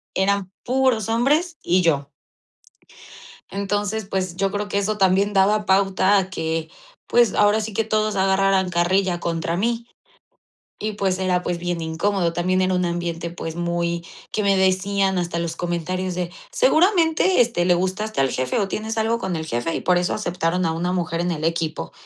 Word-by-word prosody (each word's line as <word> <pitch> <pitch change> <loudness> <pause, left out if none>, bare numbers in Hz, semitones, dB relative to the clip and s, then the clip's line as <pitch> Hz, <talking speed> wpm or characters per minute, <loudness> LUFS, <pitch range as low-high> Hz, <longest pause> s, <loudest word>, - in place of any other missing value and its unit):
eran 195 0 +1
puros 255 -4 +1
hombres 300 +9 +1
y 180 +1 +3
yo. 145 -4 +1 1.4
Entonces, 205 +1 -2
pues, 185 -3 -3
yo 195 0 0
creo 205 +1 -3
que 200 - 0
eso 210 +1 -1
también 195 +2 +3
daba 205 +2 +3
pauta 195 +1 +3
a 190 0 -2
que, 160 -2 -3 0.4
pues, 240 -2 +3
ahora 210 +1 +4
sí 215 0 -4
que 225 - +1
todos 215 -1 0
agarraran 190 -1 +2
carrilla 175 +1 +1
contra 165 0 -2
mí. 235 +3 -1 0.9
Y, 215 0 -2
pues, 190 -2 -1
era, 180 -1 0
pues, 175 -1 -2
bien 175 -1 -3
incómodo. 170 +2 0
También 185 +2 0
era 185 0 +1
un 180 0 +1
ambiente, 170 -1 -3
pues, 165 -1 -6
muy 170 0 -2 0.3
que 215 - 0
me 200 -1 +3
decían 190 0 +1
hasta 170 -1 -2
los 170 -1 -3
comentarios 180 +1 -2
de: 175 -1 -3 0.2
"Seguramente, 370 - +3
este, 225 -7 +2
le 180 -1 +4
gustaste 190 +1 -2
al 135 -1 +2
jefe, 130 0 -1
o, 200 -2 0
tienes 220 +2 -3
algo 225 +1 +1
con 190 -6 -3
el 160 0 -4
jefe, 120 +4 -2
y - - -2
por 180 -1 +2
eso 180 - 0
aceptaron 180 -2 -1
a 160 - 0
una 175 +2 -2
mujer 170 -2 -2
en 175 +1 0
el 155 -2 -3
equipo". 160 - -2
185 Hz, 180 wpm, -22 LUFS, 170-205 Hz, 1.4 s, ahora